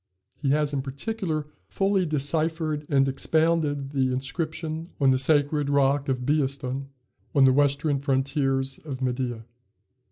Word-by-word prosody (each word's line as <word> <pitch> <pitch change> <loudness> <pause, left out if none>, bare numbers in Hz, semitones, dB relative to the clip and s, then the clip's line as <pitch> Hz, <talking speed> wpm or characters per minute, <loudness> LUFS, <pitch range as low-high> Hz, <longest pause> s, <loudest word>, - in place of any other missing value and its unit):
He 140 - -3
has, 150 +1 +1
in 140 - 0
particular, 155 - -3 0.2
fully 195 -2 +1
deciphered 155 +1 -1
and 135 -2 +3
expounded 150 0 +1
the 130 -2 +1
inscription 155 +5 -4
on 135 -2 +4
the 130 - +2
sacred 145 +1 +2
rock 140 0 +2
of 125 -1 -1
Behistun, 135 -2 -1 0.5
on 140 -2 +6
the 130 - +5
western 145 +1 +2
frontiers 135 -1 0
of 140 -5 -7
Media. 125 -3 -2
140 Hz, 130 wpm, -26 LUFS, 135-155 Hz, 0.5 s, on